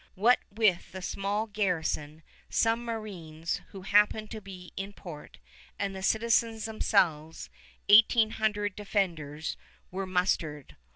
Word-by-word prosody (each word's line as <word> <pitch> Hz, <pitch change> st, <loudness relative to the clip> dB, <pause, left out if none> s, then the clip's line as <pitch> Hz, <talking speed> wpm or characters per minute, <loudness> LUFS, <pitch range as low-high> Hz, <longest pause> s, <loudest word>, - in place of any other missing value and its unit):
What 230 Hz, +6 st, +4 dB
with 205 Hz, -5 st, +1 dB
the 190 Hz, -, -6 dB
small 200 Hz, +4 st, -1 dB
garrison, 165 Hz, -7 st, -2 dB, 0.3 s
some 230 Hz, +1 st, +2 dB
marines 180 Hz, -9 st, -4 dB
who 190 Hz, -2 st, -10 dB
happened 210 Hz, +2 st, +3 dB
to 220 Hz, -, -6 dB
be 185 Hz, -2 st, -11 dB
in 195 Hz, +1 st, -5 dB
port, 170 Hz, -7 st, -10 dB, 0.4 s
and 195 Hz, -1 st, -2 dB
the 190 Hz, -, -6 dB
citizens 225 Hz, +2 st, +2 dB
themselves, 175 Hz, -8 st, 0 dB, 0.4 s
eighteen 220 Hz, +1 st, +6 dB
hundred 210 Hz, -3 st, -1 dB
defenders 165 Hz, -8 st, -2 dB, 0.3 s
were 190 Hz, +1 st, -3 dB
mustered. 170 Hz, -6 st, -1 dB
195 Hz, 120 wpm, -29 LUFS, 175-215 Hz, 0.4 s, eighteen